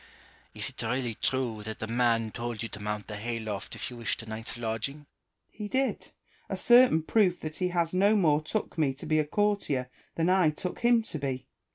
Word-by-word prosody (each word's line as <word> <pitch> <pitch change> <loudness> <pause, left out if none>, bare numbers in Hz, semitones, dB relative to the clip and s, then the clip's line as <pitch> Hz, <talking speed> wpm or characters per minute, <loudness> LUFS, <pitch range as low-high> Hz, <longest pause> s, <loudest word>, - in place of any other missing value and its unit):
Is - - +2
it - - -5
really 120 +1 -1
true 120 -2 -1
that 110 +1 -5
the - - -4
man 115 -1 +1
told 120 0 -4
you 115 - -4
to 105 - -7
"inount 105 0 -3
the 105 - -6
hay 115 +2 -3
loft 105 -3 -5
if - - -3
you 120 - -9
wished 115 -1 -1
a - - -11
night's 110 +2 -1
lodging? 120 +6 -3 0.4
Malesherbes. - - -47
He 210 -1 -6
did; 265 +4 -1 0.4
a - - -2
certain 240 -9 +6
proof 185 -1 +3
that 155 0 -5
he 180 -1 0 0.2
no 200 +4 +4
more 155 -7 +3
took 170 +2 -3
me 140 -4 +2
to 135 - -9
be 155 0 +2
a 155 - +2
courtier 150 -9 0 0.2
than 165 0 +1
I 185 -3 +4
took 175 +4 -5
him 240 -1 +4
to 160 - -5
be. 130 -2 -3
135 Hz, 215 wpm, -29 LUFS, 115-180 Hz, 0.4 s, certain